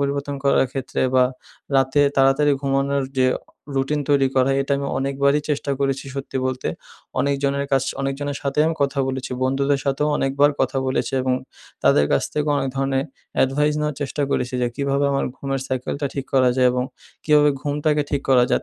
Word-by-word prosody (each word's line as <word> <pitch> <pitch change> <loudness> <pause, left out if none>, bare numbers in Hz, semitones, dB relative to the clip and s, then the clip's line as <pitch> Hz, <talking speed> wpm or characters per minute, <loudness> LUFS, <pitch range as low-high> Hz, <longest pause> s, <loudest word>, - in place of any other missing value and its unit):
পরিবর্তন 140 0 -1
করার 140 -1 +4
ক্ষেত্রে 135 -1 -3
বা, 130 -1 +6 0.5
রাতে 135 +2 +3 0.2
তাড়াতাড়ি 135 +2 +4
ঘুমানোর 140 0 +1
যে 130 - +4
আ - - -10 0.4
রুটিন 135 +3 0
তৈরি 140 -2 +4
করা, 130 0 +3
এটা 140 - -2
আমি 140 - -3
অনেকবারই 140 +2 +1
চেষ্টা 145 -1 -1
করেছি, 135 -1 0
সত্যি 135 -1 -5
বলতে। 130 0 -2 0.5
অনেকজনের 140 0 0
কাছ 135 -1 +3 0.2
অনেকজনের 140 +1 -2
সাথেই 140 +2 +1
আমি 165 - 0
কথা 140 0 -1
বলেছি। 130 -1 -4
বন্ধুদের 135 +1 +1
সাথেও 140 +2 0
অনেকবার 140 +2 +3
কথা 135 +1 +1
বলেছি 130 +1 -1
এবং 130 0 +1 0.5
তাদের 75 - +5
কাছ - - +3
থেকেও 150 0 0
অনেক 135 -1 -1
ধরনের 135 0 0 0.4
advice 150 +3 +1
নেওয়ার 150 -2 -2
চেষ্টা 145 +1 -2
করেছি। 125 -1 -1
যে - - +2
কীভাবে 140 0 0
আমার 135 - 0
ঘুমের 135 -1 -3
সাইকেলটা 130 +2 -2
ঠিক 135 -2 -3
করা 130 -1 +5
যায়? 130 -1 +5
এবং 125 0 0 0.4
কীভাবে 150 -1 +5
ঘুমটাকে 150 +1 0
ঠিক 140 -1 -1
করা 125 -2 +5
যায়। - - +2
140 Hz, 175 wpm, -22 LUFS, 135-145 Hz, 0.5 s, বা